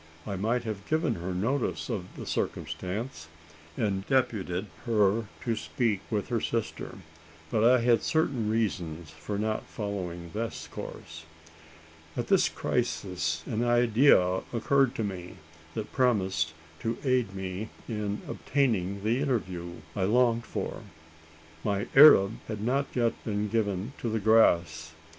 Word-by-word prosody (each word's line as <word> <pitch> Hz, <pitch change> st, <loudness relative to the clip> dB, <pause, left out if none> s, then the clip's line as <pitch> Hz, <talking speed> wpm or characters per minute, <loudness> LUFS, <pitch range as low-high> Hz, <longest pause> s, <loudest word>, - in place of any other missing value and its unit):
I 100 Hz, -, -3 dB
might 115 Hz, +6 st, 0 dB
have 105 Hz, -3 st, -5 dB
given 155 Hz, +1 st, +2 dB
her 85 Hz, +2 st, -4 dB
notice 115 Hz, +9 st, -1 dB
of 105 Hz, -7 st, -3 dB
the -, -, -6 dB
circumstance, 90 Hz, -, -3 dB, 0.5 s
and 100 Hz, -4 st, 0 dB
deputed 110 Hz, -8 st, 0 dB, 0.2 s
her 110 Hz, -1 st, +3 dB, 0.2 s
to 115 Hz, -2 st, 0 dB
speak 110 Hz, -2 st, 0 dB
with 105 Hz, -3 st, -2 dB
her 115 Hz, -3 st, 0 dB
sister; 115 Hz, -1 st, -3 dB, 0.5 s
but 110 Hz, -, +2 dB
I 125 Hz, +1 st, +6 dB
had 120 Hz, -1 st, +4 dB
certain 135 Hz, -9 st, +1 dB
reasons 85 Hz, -8 st, -2 dB
for 80 Hz, +6 st, -5 dB
not 110 Hz, +1 st, -2 dB
following 90 Hz, -5 st, -5 dB
this 115 Hz, +1 st, -4 dB
course. 80 Hz, 0 st, -8 dB, 0.9 s
At -, -, -2 dB
this -, -, +4 dB
crisis 85 Hz, -4 st, -1 dB
an 115 Hz, +1 st, -1 dB
idea 120 Hz, -5 st, +4 dB
occurred 135 Hz, +2 st, +2 dB
to 110 Hz, -, -1 dB
me, 95 Hz, -3 st, -5 dB, 0.4 s
that 110 Hz, -, -5 dB
promised 95 Hz, -, +1 dB, 0.2 s
to 115 Hz, 0 st, -2 dB
aid 125 Hz, -7 st, +1 dB
me 95 Hz, +3 st, -4 dB, 0.2 s
in 105 Hz, -2 st, -3 dB
obtaining 100 Hz, -8 st, 0 dB
the 115 Hz, +4 st, +1 dB
interview 90 Hz, -11 st, -2 dB
I 95 Hz, -3 st, +1 dB
longed 120 Hz, +2 st, +3 dB
for. -, -, -4 dB, 0.8 s
My 100 Hz, -1 st, 0 dB
Arab 125 Hz, -8 st, +8 dB
had 105 Hz, -2 st, -4 dB
not 135 Hz, +4 st, +1 dB
yet 120 Hz, -2 st, +2 dB
been 105 Hz, -1 st, -1 dB
given 105 Hz, +1 st, -1 dB
to 120 Hz, -, -2 dB
the 110 Hz, -, 0 dB
grass! 85 Hz, -7 st, +3 dB
105 Hz, 135 wpm, -28 LUFS, 95-120 Hz, 0.9 s, Arab